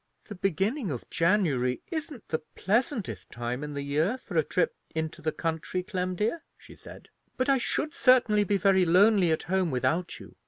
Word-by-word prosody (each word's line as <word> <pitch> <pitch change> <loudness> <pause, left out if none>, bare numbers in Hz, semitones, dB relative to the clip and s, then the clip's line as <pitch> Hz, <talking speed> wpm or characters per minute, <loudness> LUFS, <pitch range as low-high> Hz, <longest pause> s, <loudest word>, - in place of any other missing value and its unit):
"The - - -5
beginning 195 - -1
of 125 -6 -5
January 165 -9 +1
isn't 310 -6 -5
the 160 - -1
pleasantest 230 +1 -1
time 120 +3 -4
in 150 -1 -6
the 140 - -3
year 155 - 0
for 205 -8 -10
a 160 - +5
trip 180 - 0 0.2
into 160 -1 -3
the 155 - 0
country, 165 +3 -3
Clem, 185 -2 -3
dear," 225 - -1 0.2
she - - -15
said; - - -13 0.3
"but 255 +1 0
I 270 -1 +4
should 300 +5 -2
certainly 240 -5 +4
be 200 0 +1
very 195 -1 +4
lonely 185 +2 +5
at 160 - 0
home 185 -1 0
without 160 +6 -1
you. - - -13
185 Hz, 185 wpm, -28 LUFS, 160-215 Hz, 0.3 s, a